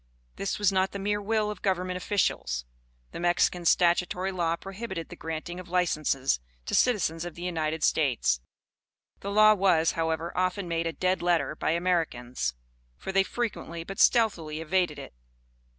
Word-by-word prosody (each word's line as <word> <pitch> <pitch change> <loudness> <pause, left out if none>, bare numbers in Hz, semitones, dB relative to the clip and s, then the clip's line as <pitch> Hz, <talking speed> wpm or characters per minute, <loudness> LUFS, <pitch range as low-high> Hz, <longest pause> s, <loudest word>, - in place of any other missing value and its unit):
This 195 - -2
was 205 -2 +3
not 190 0 +1
the - - -3
mere 205 +1 -1
will 215 0 0
of 210 - -9
governmental 185 -1 0
officials; 120 - -1 0.5
the - - -7
Mexican 175 0 +1
statutory 180 +2 +2
law 170 -3 0
prohibited 195 -1 -6
the - - -9
granting 165 +2 -5
of 180 -1 -10
licenses 155 - +1 0.3
to - - -5
citizens 170 -9 +2
of 175 -2 -7
the 175 - -8
United 160 -3 -2
States. 115 - +2 0.8
This 200 - -5
law 215 +1 +6
was, 185 -5 +3
however, 160 +1 -2
often 185 +1 0
made 165 0 -1
a - - -1
dead 185 0 0
letter 175 -3 +1
by - - -2
Americans; 155 - -1 0.4
for, 190 - -5
they 195 0 +4
frequently, 190 -5 -3
but 195 +3 -8
stealthily 170 -10 +3
evaded 180 +3 0
it. - - -9
175 Hz, 160 wpm, -28 LUFS, 160-195 Hz, 0.8 s, law